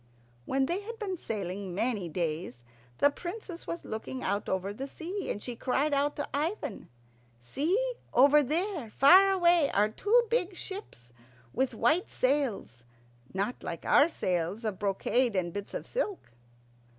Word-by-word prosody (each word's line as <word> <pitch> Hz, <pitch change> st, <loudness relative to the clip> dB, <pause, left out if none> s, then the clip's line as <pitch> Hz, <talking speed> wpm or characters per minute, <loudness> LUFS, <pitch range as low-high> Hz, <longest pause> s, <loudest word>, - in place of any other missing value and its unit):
When 270 Hz, 0 st, +1 dB
they 345 Hz, +7 st, -1 dB
had 460 Hz, +3 st, -7 dB
been 400 Hz, -4 st, -3 dB
sailing 195 Hz, -, -4 dB
many 205 Hz, -4 st, -1 dB
days, 155 Hz, -7 st, -3 dB, 0.3 s
the 285 Hz, -, +4 dB
Princess 355 Hz, +2 st, -7 dB
was 335 Hz, -, -5 dB
looking 220 Hz, +4 st, -5 dB
out 200 Hz, +2 st, -1 dB
over 190 Hz, +1 st, -1 dB
the 270 Hz, +6 st, -5 dB
sea, 360 Hz, +8 st, -5 dB
and 205 Hz, -, -3 dB
she 245 Hz, -, -5 dB
cried 275 Hz, +5 st, 0 dB
out 285 Hz, +1 st, +1 dB
to 290 Hz, -, -3 dB
Ivan, 315 Hz, +9 st, -3 dB, 0.5 s
"See, 350 Hz, -, 0 dB, 0.2 s
over 285 Hz, +3 st, +6 dB
there, 315 Hz, -, -1 dB
far 365 Hz, -, +7 dB
away, 345 Hz, -5 st, +4 dB
are 210 Hz, +1 st, +2 dB
two 430 Hz, -, +3 dB
big 385 Hz, -6 st, +1 dB
ships 350 Hz, -, -7 dB, 0.4 s
with 260 Hz, -, 0 dB
white 310 Hz, -, +2 dB
sails, 255 Hz, -, -1 dB, 0.5 s
not 200 Hz, +6 st, -2 dB
like -, -, -6 dB
our 295 Hz, -, +5 dB
sails 180 Hz, -, -2 dB
of 210 Hz, -4 st, -3 dB
brocade 210 Hz, +4 st, +1 dB
and 175 Hz, -2 st, -1 dB
bits 205 Hz, 0 st, -6 dB
of -, -, -4 dB
silk." 425 Hz, -, -3 dB
270 Hz, 150 wpm, -29 LUFS, -, 0.5 s, far